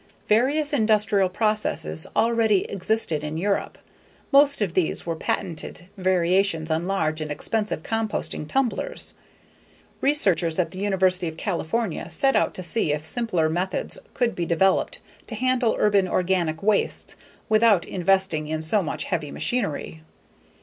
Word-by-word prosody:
Various 285 Hz, +8 st, +2 dB
industrial 210 Hz, -5 st, +3 dB
processes 185 Hz, -, -1 dB
already 225 Hz, -4 st, +3 dB
existed 195 Hz, -5 st, 0 dB
in 150 Hz, +1 st, -4 dB
Europe; 200 Hz, +4 st, -1 dB, 0.5 s
most 285 Hz, 0 st, +5 dB
of 200 Hz, -6 st, -1 dB
these 180 Hz, -3 st, 0 dB
were 165 Hz, -1 st, -2 dB
patented 170 Hz, +1 st, -3 dB
variations 185 Hz, -2 st, +1 dB
on 160 Hz, +3 st, -1 dB
large 160 Hz, -5 st, -1 dB
and 155 Hz, -, -4 dB
expensive 210 Hz, +3 st, -2 dB
composting 225 Hz, -8 st, -2 dB
tumblers. 265 Hz, -, -1 dB, 0.9 s
Researchers 185 Hz, -, +3 dB
at 180 Hz, -, 0 dB
the 185 Hz, -, -8 dB
University 190 Hz, -3 st, +1 dB
of 160 Hz, 0 st, -6 dB
California 185 Hz, 0 st, -2 dB
set 270 Hz, -, +1 dB
out -, -, +1 dB
to 185 Hz, -, -4 dB
see 175 Hz, -3 st, +1 dB
if 150 Hz, +1 st, -2 dB
simpler 185 Hz, -6 st, 0 dB
methods 180 Hz, -, -2 dB, 0.2 s
could 245 Hz, -2 st, +1 dB
be 175 Hz, -, -2 dB
developed 190 Hz, +3 st, +1 dB, 0.3 s
to 230 Hz, -, -6 dB
handle 255 Hz, 0 st, +1 dB
urban 200 Hz, -3 st, +3 dB
organic 175 Hz, -3 st, 0 dB
wastes 210 Hz, 0 st, 0 dB, 0.3 s
without 215 Hz, -4 st, +4 dB
investing 190 Hz, -4 st, 0 dB
in 155 Hz, 0 st, -2 dB
so 195 Hz, +6 st, +2 dB
much 160 Hz, -, -3 dB
heavy 160 Hz, -5 st, -3 dB
machinery. 160 Hz, -9 st, -2 dB
190 Hz, 135 wpm, -24 LUFS, 165-220 Hz, 0.9 s, most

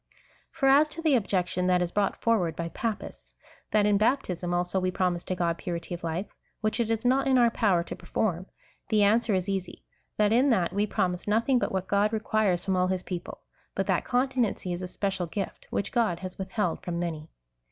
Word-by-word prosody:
For 275 Hz, -, -2 dB
as 285 Hz, +3 st, +6 dB
to 320 Hz, +2 st, -7 dB
the 310 Hz, -3 st, +4 dB
objection 185 Hz, -5 st, +1 dB
that 180 Hz, -1 st, +4 dB
is 175 Hz, -1 st, -1 dB
brought 205 Hz, +1 st, 0 dB
forward 200 Hz, -8 st, +2 dB
by 170 Hz, 0 st, -3 dB
Papists 225 Hz, +4 st, -5 dB, 0.2 s
— -, -, -30 dB
that 210 Hz, -1 st, +3 dB
in 205 Hz, -1 st, +3 dB
baptism, 190 Hz, -7 st, 0 dB
also, 175 Hz, +2 st, 0 dB
we 185 Hz, 0 st, 0 dB
promise 180 Hz, -1 st, 0 dB
to 185 Hz, -, -2 dB
God 170 Hz, -2 st, -1 dB
purity 170 Hz, -1 st, -4 dB
of 175 Hz, -, -6 dB
life, 170 Hz, +4 st, -2 dB, 0.3 s
which 215 Hz, 0 st, -1 dB
it 230 Hz, -2 st, +1 dB
is 225 Hz, +1 st, -1 dB
not 265 Hz, +2 st, +3 dB
in 265 Hz, -1 st, +4 dB
our 240 Hz, -2 st, +5 dB
jjower 190 Hz, -7 st, +2 dB
to -, -, -6 dB
perform, 185 Hz, -3 st, -2 dB, 0.4 s
the 210 Hz, -1 st, +4 dB
answer 220 Hz, +1 st, +3 dB
is 185 Hz, 0 st, -1 dB
easy 190 Hz, -2 st, -4 dB, 0.2 s
— -, -, -47 dB
that 210 Hz, 0 st, +3 dB
in 255 Hz, +4 st, +4 dB
that 185 Hz, -9 st, +2 dB
we 205 Hz, +2 st, +1 dB
promise 180 Hz, -2 st, -1 dB
nothing 230 Hz, +5 st, +3 dB
but -, -, -1 dB
what 190 Hz, -1 st, -2 dB
God 205 Hz, +2 st, +2 dB
requires 215 Hz, -4 st, +1 dB
from 190 Hz, -, +1 dB
all 180 Hz, 0 st, +2 dB
his 185 Hz, -1 st, -1 dB
peoi)le, 180 Hz, -2 st, -6 dB, 0.4 s
but -, -, 0 dB
that -, -, +1 dB
continency 245 Hz, -7 st, 0 dB
is 175 Hz, -, -4 dB
a 185 Hz, -, -4 dB
special 190 Hz, -1 st, -2 dB
gift, 195 Hz, +4 st, -5 dB
which 200 Hz, -, -2 dB
God 215 Hz, -8 st, +1 dB
has 185 Hz, 0 st, -7 dB
withheld 190 Hz, -2 st, -2 dB
from 175 Hz, -1 st, -4 dB
many. 165 Hz, -2 st, -4 dB
195 Hz, 215 wpm, -27 LUFS, 180-225 Hz, 0.4 s, as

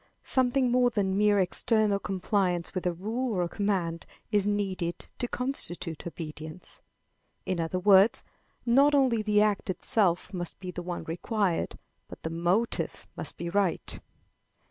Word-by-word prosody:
Something 255 Hz, -1 st, +2 dB
more 250 Hz, 0 st, +4 dB
than 195 Hz, -5 st, 0 dB
mere 205 Hz, 0 st, +4 dB
external 205 Hz, +2 st, +2 dB
compliance 185 Hz, -3 st, -1 dB
with 185 Hz, -1 st, -2 dB
a -, -, +2 dB
rule 220 Hz, +8 st, -2 dB
or 180 Hz, -, +1 dB
a -, -, -1 dB
command 175 Hz, -4 st, -1 dB, 0.2 s
is 205 Hz, -2 st, +2 dB
needed 190 Hz, -4 st, -1 dB
to 245 Hz, -, 0 dB
constitute 175 Hz, -, -2 dB
obedience. 155 Hz, 0 st, -8 dB, 0.6 s
In 185 Hz, -2 st, -1 dB
other 165 Hz, +2 st, -1 dB
words, 200 Hz, +5 st, +5 dB, 0.4 s
not 275 Hz, +5 st, +5 dB
only 255 Hz, -5 st, +3 dB
the 210 Hz, -1 st, +3 dB
act 210 Hz, -3 st, 0 dB
itself 185 Hz, 0 st, 0 dB
must 175 Hz, -2 st, -5 dB
be 185 Hz, -1 st, -6 dB
the 180 Hz, -, -5 dB
one 175 Hz, 0 st, -4 dB
required, 180 Hz, +1 st, -1 dB, 0.3 s
but -, -, -12 dB
the 160 Hz, -, -3 dB
motive 175 Hz, +8 st, 0 dB
must -, -, -5 dB
be 170 Hz, -, -4 dB
right. 190 Hz, 0 st, 0 dB
195 Hz, 145 wpm, -28 LUFS, 175-220 Hz, 0.6 s, words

